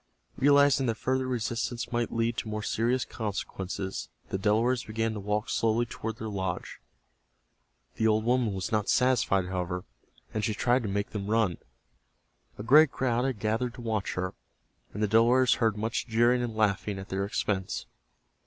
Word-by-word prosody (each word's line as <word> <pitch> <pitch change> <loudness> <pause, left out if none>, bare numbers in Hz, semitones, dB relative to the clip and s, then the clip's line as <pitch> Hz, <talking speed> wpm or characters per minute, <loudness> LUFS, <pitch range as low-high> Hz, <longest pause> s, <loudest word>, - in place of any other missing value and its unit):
Realizing 140 -1 +4
that 115 - 0
further 130 +2 -1
resistance 120 0 -2
might 120 -1 -1
lead 115 0 0
to - - -3
more 105 0 -3
serious 120 +4 0
consequences 95 -3 -4 0.2
the 95 - -2
Delawares 115 +5 +2
began 115 +1 -1
to 105 - -5
walk 105 +2 -1
slowly 115 +1 +1
toward 115 -2 -5
their 110 - -5
lodge. 95 -4 -4 1.2
The 110 - +2
old 110 0 +2
woman 120 -2 +2
was 95 +4 -4
not 105 -2 0
satisfied, 125 -7 +3
however, 90 0 -3 0.5
and 110 - -2
she 110 -1 0
tried 125 +4 +2
to 110 - -3
make 100 +1 -2
them 100 -2 -4
run. 110 -6 +1 1.0
A 105 - -6
great 150 +6 +7
crowd 125 -1 0
had 130 -4 -1
gathered 110 +4 -1
to 125 - -9
watch 110 -4 -2
her, 90 0 -3 0.6
and 105 - -3
the - - +3
Delawares 120 +4 +4
heard 110 -2 +2
much 110 +3 -2
jeering 120 +2 +3
and 120 -2 -3
laughing 105 -1 0
at 95 0 -8
their 95 +1 -1
expense. 100 -1 -2
110 Hz, 170 wpm, -28 LUFS, 100-120 Hz, 1.2 s, great